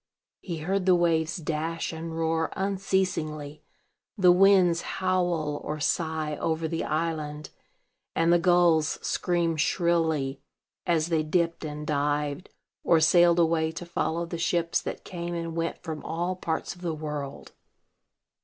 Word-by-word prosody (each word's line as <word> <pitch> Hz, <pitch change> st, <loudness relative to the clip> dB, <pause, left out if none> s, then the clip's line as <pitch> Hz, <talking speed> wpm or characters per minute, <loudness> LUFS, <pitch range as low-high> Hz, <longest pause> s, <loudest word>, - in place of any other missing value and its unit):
He 170 Hz, -3 st, -5 dB
heard 190 Hz, +1 st, 0 dB
the 185 Hz, -, +6 dB
waves 170 Hz, -1 st, +1 dB
dash 165 Hz, +1 st, -3 dB
and 165 Hz, 0 st, -6 dB
roar 160 Hz, 0 st, 0 dB
unceasingly; 185 Hz, -6 st, -1 dB, 0.6 s
the 180 Hz, -3 st, +6 dB
winds 180 Hz, -2 st, +5 dB
howl 175 Hz, -5 st, -1 dB
or 150 Hz, 0 st, -4 dB
sigh 155 Hz, -1 st, -1 dB
over 160 Hz, +1 st, -1 dB
the 165 Hz, +1 st, -2 dB
island; 155 Hz, -2 st, -3 dB, 0.6 s
and 165 Hz, +1 st, +3 dB
the 175 Hz, -, +5 dB
gulls 170 Hz, -3 st, +3 dB
scream 170 Hz, -2 st, 0 dB
shrilly 160 Hz, -4 st, +1 dB, 0.5 s
as 165 Hz, -1 st, +2 dB
they 160 Hz, -2 st, +2 dB
dipped 165 Hz, +2 st, 0 dB
and 150 Hz, -1 st, -5 dB
dived, 145 Hz, +2 st, -1 dB, 0.3 s
or 165 Hz, -, +4 dB
sailed 170 Hz, +1 st, +5 dB
away 160 Hz, -1 st, +2 dB
to 175 Hz, -, -6 dB
follow 170 Hz, 0 st, -1 dB
the 170 Hz, 0 st, -6 dB
ships 170 Hz, 0 st, +1 dB
that -, -, -6 dB
came 175 Hz, -1 st, -5 dB
and 165 Hz, -1 st, -4 dB
went 165 Hz, 0 st, -3 dB
from 160 Hz, -3 st, -5 dB
all 175 Hz, +3 st, -2 dB
parts 165 Hz, -3 st, -3 dB
of 175 Hz, -, -17 dB
the 170 Hz, -3 st, -2 dB
world. 150 Hz, -2 st, -6 dB
165 Hz, 140 wpm, -27 LUFS, 155-175 Hz, 0.6 s, the